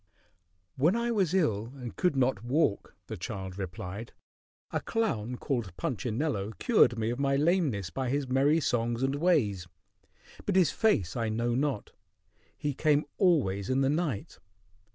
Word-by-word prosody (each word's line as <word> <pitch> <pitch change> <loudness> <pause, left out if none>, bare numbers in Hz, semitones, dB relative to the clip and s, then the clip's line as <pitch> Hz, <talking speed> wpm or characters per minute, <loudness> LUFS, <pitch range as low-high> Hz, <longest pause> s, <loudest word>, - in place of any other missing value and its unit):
"When 160 +10 +3
I 235 0 0
was 195 -8 +1
ill 115 - 0
and 125 -4 -7
could 180 -5 +1
not 125 -5 +1
walk," 125 -4 0
the - - -6
child 95 -1 -6
replied, 95 +4 -6 0.6
"a - - -1
clown 125 - -1
called 120 - -3
Punchinello 115 -2 -2
cured 215 - +4
me 110 +1 0
of 120 - -4
my 140 0 +2
lameness 145 - +1
by 130 -2 -2
his 140 +1 -1
merry 140 +5 +3
songs 120 -1 0
and 135 +1 +1
ways; 140 - +1 0.8
but 200 - +1
his 185 -3 +4
face 105 - +1
I 115 -2 -1
know 120 +2 0
not. 135 -3 -1 0.7
He 145 -1 -2
came 150 +1 +2
always 110 - +2
in 130 +1 +2
the 135 - +3
night. 150 - -2
130 Hz, 155 wpm, -29 LUFS, 110-155 Hz, 0.8 s, cured